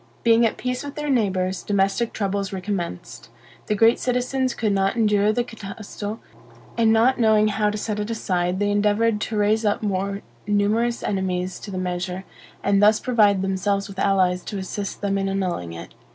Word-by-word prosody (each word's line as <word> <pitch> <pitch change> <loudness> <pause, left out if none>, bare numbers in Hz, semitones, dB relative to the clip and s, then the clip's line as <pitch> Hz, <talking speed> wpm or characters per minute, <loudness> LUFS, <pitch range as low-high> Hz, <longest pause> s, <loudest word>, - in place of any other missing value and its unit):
Being 230 0 +5
at - - -5
peace 250 +1 -3
with 285 0 -7
their 295 -1 -2
neighbors, 190 -6 0
domestic 200 +3 0
troubles 200 -1 -2
recommenced. 180 - -5 0.4
The 210 - +1
great 225 +3 +4
citizens 255 +1 0
could 215 -2 0
not 195 +2 +1
endure 210 -2 +3
the 240 +3 0
Catasto, 210 -1 -7 0.6
and 225 -1 +3
not 235 +4 +3
knowing 215 -2 +4
how 210 0 +1
to 210 - -3
set 210 0 -3
it 210 +1 -3
aside, 180 -5 -1
they 205 +1 +1
endeavored 210 +1 +2
to 220 - -2
raise 210 +2 +2
up 210 0 0
more 200 0 -2 0.2
numerous 215 +4 +1
enemies 185 -2 -2
to - - -9
the 190 - -5
measure, 180 0 -3 0.4
and 200 0 +3
thus 210 +1 +5
provide 210 -6 +3
themselves 195 +1 0
with 195 -1 -9
allies 185 -2 +2
to 205 - -5
assist 195 +1 -5
them 200 -1 0
in 195 0 -1
annulling 180 - -2
it. 85 +2 -9
205 Hz, 180 wpm, -23 LUFS, 190-220 Hz, 0.6 s, Being